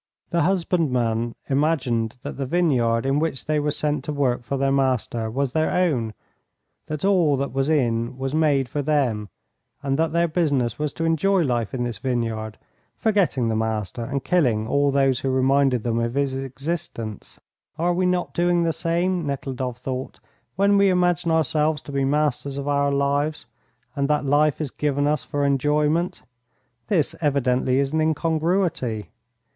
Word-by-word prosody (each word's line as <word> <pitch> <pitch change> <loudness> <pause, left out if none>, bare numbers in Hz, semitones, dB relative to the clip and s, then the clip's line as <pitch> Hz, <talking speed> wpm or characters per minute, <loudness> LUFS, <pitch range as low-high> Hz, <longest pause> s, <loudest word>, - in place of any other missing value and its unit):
The 170 - +2
husbandman 130 -11 0
imagined 135 -6 0
that - - -5
the 135 -1 -3
vineyard 125 -8 +2
in 135 +2 +2
which 155 -4 -2
they 155 0 +1
were 150 0 0
sent 150 -1 -1
to - - -2
work 135 -4 0
for 135 +3 -3
their 135 0 +1
master 130 -4 0
was 130 +2 -2
their 160 0 +1
own, 130 - 0 0.7
that 155 +2 -3
all 175 -8 +3
that 140 0 -3
was 135 +2 0
in 120 -5 0
was 135 +1 -3
made 145 -4 +2
for 145 +4 -2
them, 130 -8 0 0.5
and 135 +1 0
that 160 -1 +1
their 170 +1 +2
business 145 -8 0
was 150 -1 -1
to 165 - -3
enjoy 175 +3 +2
life 120 -6 -1
in 125 - -1
this 120 -4 -4
vineyard, 115 -4 -2 0.4
forgetting 195 - +1
the 110 - 0
Master 110 0 -2
and 135 +2 -3
killing 125 -12 +2
all 140 +3 +2
those 135 -2 +2
who 135 - -2
reminded 130 -2 +2
them 115 -1 0
of 115 +1 -2
his 140 -1 0
existence. 135 - -5 0.4
"Are 175 +2 +1
we 180 +1 +1
not 180 -1 -1
doing 175 0 +2
the 165 -1 +1
same," 170 +1 -1
Nekhludoff 130 -3 -3
thought, 130 +1 -5 0.4
"when 200 +2 +3
we 200 0 +5
imagine 180 -1 +2
ourselves 155 -1 +1
to - - -9
be 140 -1 0
masters 140 -1 0
of 140 0 -4
our 140 0 +2
lives, 140 +2 0 0.5
and 140 0 0
that 150 0 +1
life 145 +1 +2
is 150 -5 -3
given 145 -1 0
us 150 -1 +1
for 145 0 -1
enjoyment? 150 +5 +1 0.6
This 180 -9 +1
evidently 130 -3 +1
is 140 +1 0
an 160 - +2
incongruity. 160 - 0
140 Hz, 170 wpm, -23 LUFS, 125-160 Hz, 0.7 s, we